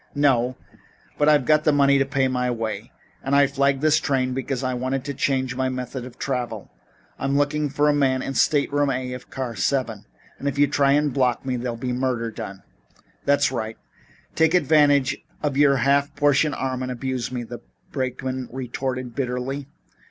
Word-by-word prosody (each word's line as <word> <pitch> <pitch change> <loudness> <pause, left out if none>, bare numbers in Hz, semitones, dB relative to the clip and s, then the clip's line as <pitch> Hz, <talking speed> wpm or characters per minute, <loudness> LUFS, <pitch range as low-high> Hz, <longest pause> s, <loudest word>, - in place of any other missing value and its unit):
"No, 130 -3 +2 0.6
but 150 +1 +4
I've 145 -4 +4
got 155 0 +4
the 155 - +4
money 140 -1 +4
to 135 - +1
pay 135 -1 +1
my 125 -1 0
way. 115 -2 -4 0.3
And 135 +1 +1
I 140 0 +6
flagged 140 0 +1
this 155 0 +4
train 130 -4 0
because 135 0 -3
I 130 0 0
wanted 130 +1 -2
to 140 - -3
change 130 -1 0
my 130 0 0
method 125 0 -5
of 125 0 -11
travel. 120 -6 -3 0.5
I'm 135 +1 0
looking 145 +1 +1
for 145 +2 +1
a 150 - +4
man 130 -3 +1
in 135 - -3
stateroom 145 0 +2
A 130 -1 -2
of 125 - -9
car 125 -3 -4
7, 125 -7 -1 0.4
and 140 - -4
if 140 -1 -2
you 145 - +6
try 140 0 +3
to 150 - +1
block 130 -2 0
me 130 -1 -1
there'll 120 -1 -3
be 125 +1 -3
murder 125 -2 -1
done." 95 -2 -8 0.6
"That's 140 -1 +3
right. 110 -3 -4 0.6
Take 160 +2 +3
advantage 145 -4 +4 0.3
of 145 -2 0
your 140 -1 +5
half 140 +3 +2
portion 145 +1 +2
arm 130 -1 -2
and 130 0 -3
abuse 125 0 -3
me," 125 -1 -3
the - - -8 0.3
brakeman 130 0 -3
retorted 130 0 -4
bitterly. 135 +1 -3
135 Hz, 185 wpm, -23 LUFS, 125-140 Hz, 0.6 s, I